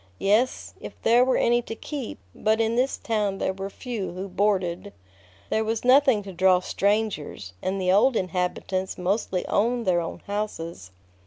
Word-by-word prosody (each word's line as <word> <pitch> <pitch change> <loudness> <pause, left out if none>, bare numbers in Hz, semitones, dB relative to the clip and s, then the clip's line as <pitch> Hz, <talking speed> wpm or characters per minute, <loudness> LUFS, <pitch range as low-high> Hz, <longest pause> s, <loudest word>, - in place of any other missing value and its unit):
Yes, 220 +6 +1
if - - -10
there 235 +2 +5
were 255 0 +2
any 240 +1 +3
to 225 - -7
keep; 275 0 -6 0.2
but 220 +1 +1
in 225 0 +1
this 255 +3 +1
town 210 -4 -1
there 190 - -1
were 195 +1 -5
few 220 -4 -5
who 185 +2 -5
boarded. 190 -1 0 0.6
There 220 - +2
was 225 +2 -2
nothing 260 -4 +5
to 195 -1 -8
draw 185 +1 +4
strangers, 200 - -1
and 190 +1 -2
the 185 -1 +2
old 230 +7 +4
inhabitants 185 0 -2
mostly 185 0 -1
owned 235 +2 +1
their 175 -2 +2
own 165 - -6
houses. 170 - -4
205 Hz, 165 wpm, -25 LUFS, 185-230 Hz, 0.6 s, there